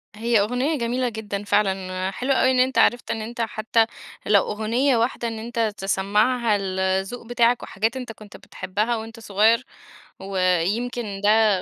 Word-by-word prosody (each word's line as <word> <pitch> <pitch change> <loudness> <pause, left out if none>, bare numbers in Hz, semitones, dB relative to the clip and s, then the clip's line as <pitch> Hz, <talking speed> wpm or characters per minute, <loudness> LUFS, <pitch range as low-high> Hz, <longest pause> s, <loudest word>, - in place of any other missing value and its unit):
هي 230 +1 +2
أغنية 250 +9 0
جميلة 245 +1 -1
جدًا 205 -2 -5
فعلًا، 190 -2 0
حلو 255 +7 -2
أوي 260 - +3
إن 255 - +1
أنت 260 +1 +2
عرفت 240 - +3
إن 220 - -3
أنت 235 +2 -5
حتى 225 0 +1 0.4
لو 205 -1 +5
أغنية 230 +5 +1
واحدة 235 0 -1
إن 225 -1 -5
أنت 230 -1 -1
تسمّعها 210 +5 +1
الذوق 190 +3 -2
بتاعك، 240 0 +2
وحاجات 225 +6 -2
أنت 250 -3 -6
كُنت 215 -2 -13
بتحبها 215 +5 -3
وأنت 225 +1 -8
صغير، 225 +4 +2 0.5
و 195 0 -5 0.3
يمكن 215 0 -3
ده 220 +1 +5
220 Hz, 155 wpm, -23 LUFS, 200-240 Hz, 0.5 s, لو